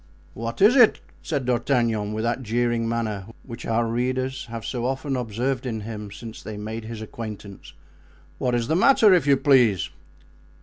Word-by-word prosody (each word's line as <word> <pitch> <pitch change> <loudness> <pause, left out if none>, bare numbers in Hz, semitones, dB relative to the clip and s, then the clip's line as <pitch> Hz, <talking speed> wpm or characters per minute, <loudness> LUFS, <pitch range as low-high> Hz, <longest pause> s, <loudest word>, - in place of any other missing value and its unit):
"What 115 - -2
is 220 +6 +7
it?" 245 -5 +6 0.2
said 145 -5 -2
D'Artagnan, 120 -4 +1
with 110 +1 -2
that 120 +2 -1
jeering 120 0 0
manner 110 -4 -2 0.2
which 115 -3 -8
our 115 +1 +1
readers 130 +3 -2
have 115 -1 -7
so 125 -1 -2
often 135 +1 -2
observed 125 +2 -2
in 110 -3 -3
him 105 -1 -6
since 110 +2 -9
they 110 -1 -7
made 110 +2 -5
his 110 -1 -6
acquaintance. 105 -3 -8 0.7
"What 125 -1 +1
is 120 -1 -1
the 160 - +1
matter, 215 0 +6
if 175 -5 +3
you 140 -1 +5
please?" 125 - +3
120 Hz, 170 wpm, -24 LUFS, 110-130 Hz, 0.7 s, is